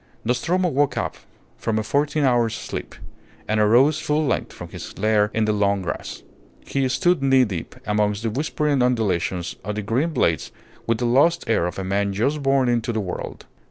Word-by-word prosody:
Nostromo 170 Hz, +10 st, +1 dB
woke 145 Hz, -3 st, +1 dB
up -, -, -2 dB, 0.4 s
from 110 Hz, -1 st, -1 dB
a 110 Hz, -, 0 dB
fourteen 145 Hz, +5 st, 0 dB
hours' 120 Hz, -3 st, +2 dB
sleep, -, -, -6 dB, 0.5 s
and 110 Hz, 0 st, +1 dB
arose 125 Hz, +8 st, +4 dB
full 150 Hz, 0 st, 0 dB
length 135 Hz, -, -1 dB
from -, -, -9 dB
his -, -, -9 dB
lair 105 Hz, 0 st, +2 dB
in 110 Hz, -1 st, +1 dB
the 105 Hz, -, +1 dB
long 100 Hz, -2 st, +1 dB
grass. 75 Hz, -, -5 dB, 0.4 s
He 135 Hz, -1 st, 0 dB
stood 175 Hz, +3 st, +2 dB
knee 135 Hz, -1 st, +5 dB
deep 95 Hz, -7 st, -6 dB
amongst 105 Hz, 0 st, 0 dB
the 115 Hz, -, -1 dB
whispering 145 Hz, +1 st, 0 dB
undulations 95 Hz, -8 st, 0 dB
of 105 Hz, +2 st, -4 dB
the 105 Hz, -, -3 dB
green 125 Hz, +10 st, 0 dB
blades 85 Hz, -, 0 dB, 0.4 s
with 115 Hz, -1 st, +2 dB
the 120 Hz, -, -1 dB
lost 145 Hz, +8 st, +3 dB
air 110 Hz, -6 st, +2 dB
of 90 Hz, -, -6 dB
a 95 Hz, -, -3 dB
man 100 Hz, +1 st, 0 dB
just 140 Hz, +9 st, 0 dB
born 135 Hz, -1 st, +2 dB
into 120 Hz, -1 st, +1 dB
the 110 Hz, -, -1 dB
world. 95 Hz, -4 st, -6 dB
115 Hz, 190 wpm, -22 LUFS, 105-140 Hz, 0.5 s, knee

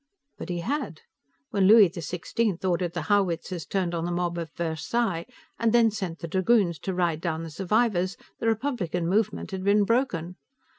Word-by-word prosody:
But -, -, -7 dB
he 175 Hz, -1 st, -2 dB
had. 255 Hz, -, -3 dB, 0.5 s
When 195 Hz, -2 st, +3 dB
Louis 215 Hz, -1 st, +8 dB
XVI 180 Hz, +3 st, -2 dB
ordered 175 Hz, -1 st, 0 dB
the 175 Hz, -, -3 dB
howitzers 180 Hz, -1 st, 0 dB
turned 185 Hz, -3 st, -1 dB
on 165 Hz, -1 st, -2 dB
the 175 Hz, -, -2 dB
mob 175 Hz, 0 st, -1 dB
at 165 Hz, -1 st, -5 dB
Versailles, 170 Hz, +3 st, -1 dB, 0.3 s
and 230 Hz, -1 st, +2 dB
then 230 Hz, -2 st, +5 dB
sent 190 Hz, -5 st, -4 dB
the 170 Hz, -, -6 dB
dragoons 190 Hz, -, +2 dB
to 190 Hz, +4 st, -3 dB
ride 170 Hz, -3 st, 0 dB
down 165 Hz, -2 st, -2 dB
the 165 Hz, -, -7 dB
survivors, 190 Hz, +1 st, +1 dB, 0.2 s
the 230 Hz, -, -1 dB
Republican 220 Hz, -, -1 dB
movement 210 Hz, +3 st, 0 dB
had 190 Hz, -1 st, -4 dB
been 205 Hz, +1 st, +4 dB
broken. 195 Hz, -7 st, 0 dB
185 Hz, 170 wpm, -26 LUFS, 170-215 Hz, 0.5 s, Louis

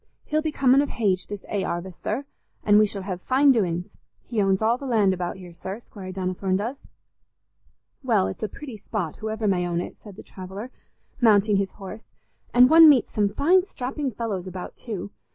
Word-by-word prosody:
He'll 310 Hz, +1 st, 0 dB
be 310 Hz, -1 st, -2 dB
comin' 275 Hz, -1 st, +4 dB
of 290 Hz, -, -2 dB
hage 195 Hz, -5 st, 0 dB
this 205 Hz, -1 st, -7 dB
'ay 200 Hz, -2 st, -1 dB
'arvest, 175 Hz, +1 st, -5 dB
sir, 255 Hz, +7 st, -2 dB, 0.4 s
an' 210 Hz, 0 st, +5 dB
we 215 Hz, -, +5 dB
shall 200 Hz, -1 st, -5 dB
hev 185 Hz, -2 st, -5 dB
fine 270 Hz, +5 st, +4 dB
doin's. 180 Hz, -7 st, 0 dB, 0.4 s
He 225 Hz, -3 st, -1 dB
owns 195 Hz, -1 st, +2 dB
all 225 Hz, +2 st, +2 dB
the 275 Hz, -, -6 dB
land 210 Hz, -6 st, +3 dB
about 180 Hz, 0 st, -4 dB
here, 180 Hz, -2 st, -11 dB
sir, 190 Hz, +5 st, -6 dB
Squire 195 Hz, -5 st, -10 dB
Donnithorne 185 Hz, 0 st, -1 dB
does." 235 Hz, +7 st, -3 dB, 1.3 s
"Well, 220 Hz, -7 st, +2 dB
it's -, -, -5 dB
a 215 Hz, -, -2 dB
pretty 260 Hz, 0 st, -9 dB
spot, 195 Hz, -5 st, -4 dB
whoever 220 Hz, 0 st, -3 dB
may 180 Hz, -3 st, +1 dB
own 170 Hz, -1 st, -1 dB
it," 175 Hz, -, -7 dB
said 205 Hz, -3 st, -12 dB
the -, -, -11 dB
traveller, 195 Hz, +6 st, -8 dB, 0.5 s
mounting 210 Hz, -3 st, +4 dB
his 195 Hz, -1 st, -1 dB
horse; 210 Hz, +2 st, -10 dB, 0.4 s
"and 245 Hz, +1 st, +7 dB
one 320 Hz, +2 st, +9 dB
meets 265 Hz, -6 st, +3 dB
some 205 Hz, -1 st, +2 dB
fine 350 Hz, -, +3 dB
strapping 275 Hz, -5 st, -4 dB
fellows 205 Hz, -5 st, -4 dB
about 185 Hz, -1 st, -7 dB
too. 200 Hz, -4 st, -6 dB
205 Hz, 195 wpm, -24 LUFS, 190-245 Hz, 1.3 s, one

